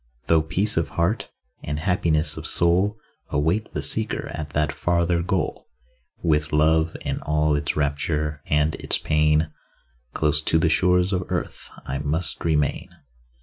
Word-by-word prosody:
Though 80 +3 +4
peace 95 +7 +1
of 80 - 0
heart, 85 +7 0 0.3
and 75 - -3
happiness 80 -2 +1
of - - -5
soul, 90 +5 +3 0.3
Await 80 +9 0
the - - -1
seeker 110 -1 0
at 75 -1 -5
that 75 0 0
farther 85 +2 0
goal, 90 +2 -2 0.6
With 75 -2 +1
love 80 +2 +2
and - - -3
all 75 0 +1
its 75 0 -2
rapture 75 +1 -1
and 75 +1 +2
its - - +1
pain, 75 0 +1 0.6
Close 75 0 +2
to 80 - +2
the 80 0 +2
shores 90 +3 +2
of 90 -1 -1
earth - - -4 0.2
I 70 +1 -3
must 75 +4 -2
remain. 75 -3 0
80 Hz, 145 wpm, -23 LUFS, 75-85 Hz, 0.6 s, Though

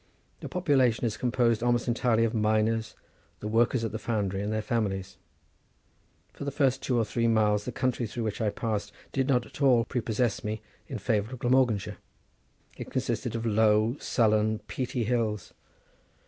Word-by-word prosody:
The - - -7
population 135 -10 +2
is 110 -2 -1
composed 120 -1 +1
almost 120 0 +1
entirely 115 -1 +2
of 115 0 0
miners, 110 0 +1 0.4
the 105 - -5
workers 115 +2 +2
at 115 - -2
the 110 - -4
foundry, 100 -5 -1
and 105 +1 -2
their 110 - 0
families. 95 -6 -2 1.2
For - - -8
the 140 - -1
first 135 -2 +1
two 125 - 0
or 115 - +2
three 115 +2 0
miles 105 -2 +2
the 125 - -3
country 125 -2 -1
through 115 +2 -4
which 110 +1 -3
I 110 - +2
passed 105 -1 -3 0.2
did 135 -1 0
not 125 -4 +2
at - - -12
all 125 -4 +5
prepossess 120 -2 -1
me 105 0 -4 0.2
in 130 - -4
favour 110 +1 -1
of - - -5
Glamorganshire: 120 -4 +1 0.8
it - - -7
consisted - - -2
of 115 0 -3
low, 110 +1 +3
sullen, 110 -2 +2
peaty 125 -2 -2
hills. 110 -3 -1
115 Hz, 170 wpm, -28 LUFS, 110-125 Hz, 1.2 s, all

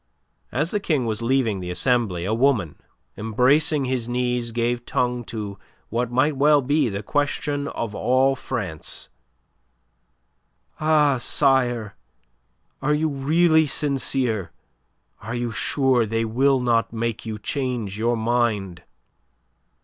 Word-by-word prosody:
As 150 +7 -1
the 210 - 0
King 155 -10 0
was 110 -1 -2
leaving 115 -4 +1
the 90 -1 -6
Assembly, 90 -2 0
a 105 - 0
woman, 115 - +2 0.4
embracing 135 +7 +2
his 125 -2 -2
knees, 125 -1 -1
gave 120 +1 -1
tongue 125 0 -1
to 105 -3 -6 0.3
what 120 +2 -1
might 135 +4 +2
well 145 +1 +4
be 145 0 +2
the 100 +1 -4
question 145 +2 -1
of 115 -6 -4
all 130 +5 +2
France: 105 - -5 1.7
"Ah, 150 -4 +3
sire, 120 - +1 0.9
are 150 +2 +2
you 155 +1 0
really 160 +3 +3
sincere? 130 - -1 0.7
Are 115 +4 -5
you 120 -1 -2
sure 130 -1 +1
they 115 +1 -1
will 130 +4 +2
not 120 -2 +1
make 115 0 -3
you 110 -1 -4
change 120 -4 -3
your 120 +1 +1
mind?" 110 -6 0
125 Hz, 125 wpm, -23 LUFS, 110-140 Hz, 1.7 s, well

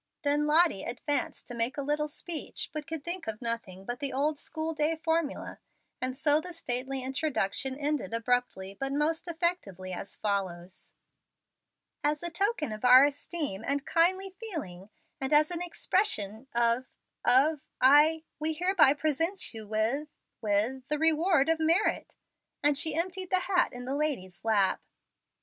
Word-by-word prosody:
Then 295 +1 +2
Lottie 315 - +4
advanced 260 +3 -2
to - - -6
make 235 +4 -1
a 285 - -2
little 300 +2 0
speech, 315 +2 -5
but 305 -1 -5
could 320 -3 -5
think 345 -3 -4
of 215 -1 -4
nothing 225 -6 -5
but 245 +3 -4
the 280 -1 -2
old 290 +3 0
school 320 0 -3
day 305 +1 +1
formula; 320 -2 -2 0.4
and 255 0 -2
so 295 +1 +3
the 360 +2 -7
stately 260 -3 -2
introduction 265 -2 -1
ended 290 -8 -2
abruptly 230 -4 -1
but 270 0 -2
most 315 +4 0
effectively, 320 - -2
as 195 - -6
follows: 185 -3 -3 1.1
"As 295 +2 0
a 345 - -3
token 385 - 0
of 215 - -8
our 255 +2 +9
esteem 285 - -4
and 280 +2 -1
kindly 375 +3 +2
feeling, 215 - -6 0.3
and 265 +1 -3
as 300 +2 +4
an 345 0 -1
expression 270 - 0
of 235 +2 +2 0.4
of 280 +3 +4 0.2
I 300 +4 +5 0.2
we 315 +1 +1
hereby 345 -3 +4
present 315 +6 0
you 220 -2 -8
with 220 +8 0 0.3
with 220 +5 0
the 300 - 0
reward 320 0 +3
of 325 0 +2
merit"; 330 +6 +1 0.5
and 295 0 +4
she 295 +2 +2
emptied 370 +2 -2
the 370 -1 +3
hat 365 -1 +1
in 245 -1 -8
the 265 - -3
lady's 270 -12 -3
lap. 205 -4 +2
290 Hz, 155 wpm, -29 LUFS, 240-320 Hz, 1.1 s, our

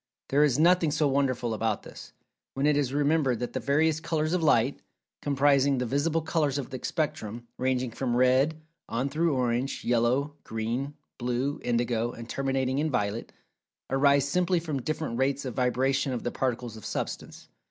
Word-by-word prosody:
There 145 +2 +4
is 140 -4 +3
nothing 170 +1 +4
so 150 0 +1
wonderful 130 -4 0
about 110 -1 -1
this, - - -11 0.4
when 135 +1 0
it 150 -1 +4
is 140 -3 +1
remembered 145 -3 +2
that 120 +2 -4
the - - -1
various 155 +3 +2
"colors" 160 0 -1
of 180 - +1
light, 135 -4 +3 0.4
comprising 140 -1 +3
the 125 - -1
visible 150 +6 0
colors 155 -4 0
of 140 -1 -5
the 130 - -5
spectrum, 120 -7 -3
ranging 130 -1 0
from 120 0 -2
red, 130 +5 +3 0.3
on 125 +4 -1
through 155 +1 +1
orange, 125 +1 -1
yellow, 125 +5 +1
green, 115 +6 -3 0.2
blue, 125 +3 -1
indigo, 120 -1 0
and 115 0 -9
terminating 135 0 -1
in 155 +1 +1
violet, 105 -3 -2 0.6
arise 140 0 +4
simply 180 +3 +2
from 155 -5 -3
different 155 -4 -3
rates 135 +1 0
of 125 - -4
vibration 130 +2 +1
of 120 - -4
the 120 - -2
Particles 120 -3 -2
of 110 - -12
Substance. - - -5
135 Hz, 170 wpm, -28 LUFS, 120-145 Hz, 0.6 s, There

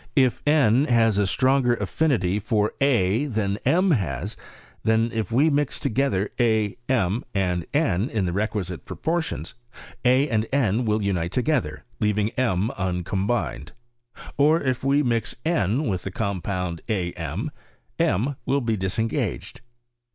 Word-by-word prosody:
If 130 -4 +3
n 140 -3 +4
has 115 -5 +3
a 100 - +2
stronger 130 +1 +2
affinity 115 - 0
for 105 0 0
a 120 -3 +2
than 105 -6 -1
m 185 +2 +3
has, 100 - -1 0.5
then 110 +1 +2
if 110 -4 -2
we 145 +7 +4
mix 145 -1 0
together 105 -5 0
a, 110 -4 +2
rn, 110 -3 +1
and 90 -3 0
n 135 - +1
in 105 -4 -1
the 85 - -1
requkite 95 -2 -3
proportions, 160 - -3 0.5
a 130 +3 +4
and 110 -4 0
n 125 -4 +1
will 105 -1 +1
unite 90 -4 -1
together, 120 - 0 0.2
leaving 105 -1 +1
m 110 -4 0
uncombined: 95 - -2 0.6
or 150 +3 +4
if 130 -4 -2
we 140 +2 +3
mix 115 -3 0
n 130 - +1
with 95 -3 -1
the 95 - -5
compound 95 -3 -3
a 90 -5 -1
m, - - -4 0.5
m 125 +9 +1
will 140 +2 +2
be 115 -2 0
disengaged. 105 +4 -2
110 Hz, 140 wpm, -24 LUFS, 95-130 Hz, 0.6 s, n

